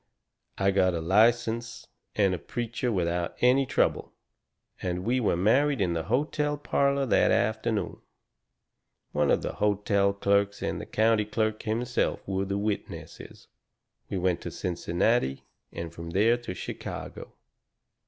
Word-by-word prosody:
I 100 0 +2
got 95 -2 +2
a - - -1
license 115 +6 +2 0.3
and 100 -3 +3
a 90 - -3
preacher 120 +3 -3
without 85 -3 -1
any 130 +2 +4
trouble, - - 0 0.7
and 90 0 -2
we 125 +3 +2
were 105 -7 +1
married 135 +9 +3
in 90 -3 +1
the 80 -1 -2
hotel 150 - 0
parlour 140 -1 +1
that 125 - +3
afternoon. 110 0 0 1.1
One 75 -1 +1
of - - +2
the - - -3
hotel 100 -1 +1
clerks 100 +1 +1
and - - -2
the - - -9
county 110 -1 +2
clerk 110 0 -1
himself 115 +3 -1
were 95 0 -1
the 100 +1 -2
witnesses. 105 0 -5 0.6
"We 95 - -2
went 90 -1 0
to - - -5
Cincinnati 85 - 0 0.3
and 85 -1 -6
from 85 0 -8
there 105 +7 +3
to 120 -6 -6
Chicago. - - -7
105 Hz, 140 wpm, -27 LUFS, 95-120 Hz, 1.1 s, any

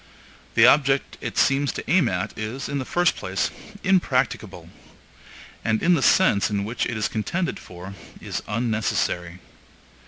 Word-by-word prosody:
The - - +7
object 140 -1 +3
it - - -5
seems 140 +1 +3
to - - -6
aim 185 +1 +3
at 90 -1 -3
is, 110 +5 -5
in 140 - -2
the 130 - -4
first 175 +4 +2
place, 95 -1 -2 0.3
impracticable, 190 -1 0 1.0
and 110 -1 0
in 175 - +5
the 165 - +2
sense 130 - +4
in 100 -1 -1
which 115 +4 -2
it 115 - -3
is 105 - 0
contended 170 - -2
for, 90 +2 -10 0.3
is - - -4
unnecessary. 105 -6 -1
115 Hz, 150 wpm, -24 LUFS, 100-145 Hz, 1.0 s, The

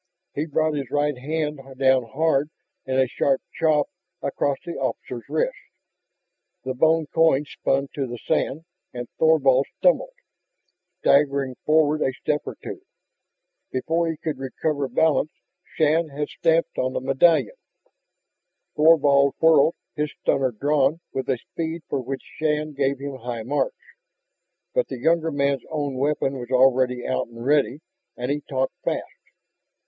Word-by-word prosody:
He 150 +3 -2
brought 155 +1 +1
his 140 -4 -3
right 145 0 +1
hand 150 +3 -3 0.2
down 130 -2 +3
hard 145 +2 +1 0.4
in 130 0 0
a 130 0 +4
sharp 135 +2 +1
chop 155 -3 +2 0.4
across 140 0 0
the 170 - -4
officer's 130 -3 -4
wrists. - - 0 1.1
The 130 - -2
bone 160 +4 +3
coin 160 -3 +4
spun 135 -1 -1
to 135 -2 -2
the 120 0 -6
sand 150 +6 -1 0.3
and 120 0 -5
Thorvald 140 -4 +4
stumbled, - - +2 0.9
staggering 140 -2 +3
forward 155 0 +3
a 130 - +1
step 150 +2 -1
or - - -5
two. - - -7 0.9
Before 165 +6 0
he 160 - -3
could 155 -2 -4
recover 140 +2 -2
balance 155 +3 +2 0.5
Shann 160 +1 +3
had 145 +1 -4
stamped 165 0 +1
on 130 0 0
the - - -1
medallion. 135 - +3 1.2
Thorvald 145 -3 +5
whirled, 160 -1 +5 0.2
his 150 -1 -1
stunner 135 -1 +1
drawn 145 +5 +1
with 130 - -3
a 130 - +2
speed 165 +6 -5
for 135 - -2
which 130 +2 -5 0.2
Shann 155 -1 0
gave 140 0 0
him 140 0 -6
high 120 -2 -5
marks. 145 - -1 1.0
But - - +1
the - - -6
younger 165 0 +2
man's 140 -3 0
own 145 -3 -2
weapon 135 0 0
was 120 0 -7
already 130 -1 +3
out 130 - -1
and 115 0 -10
ready. 145 0 +2 0.4
And 125 +2 -2
he 145 +1 -1
talked 130 -2 -2
fast. - - -1
145 Hz, 145 wpm, -24 LUFS, 130-155 Hz, 1.2 s, Thorvald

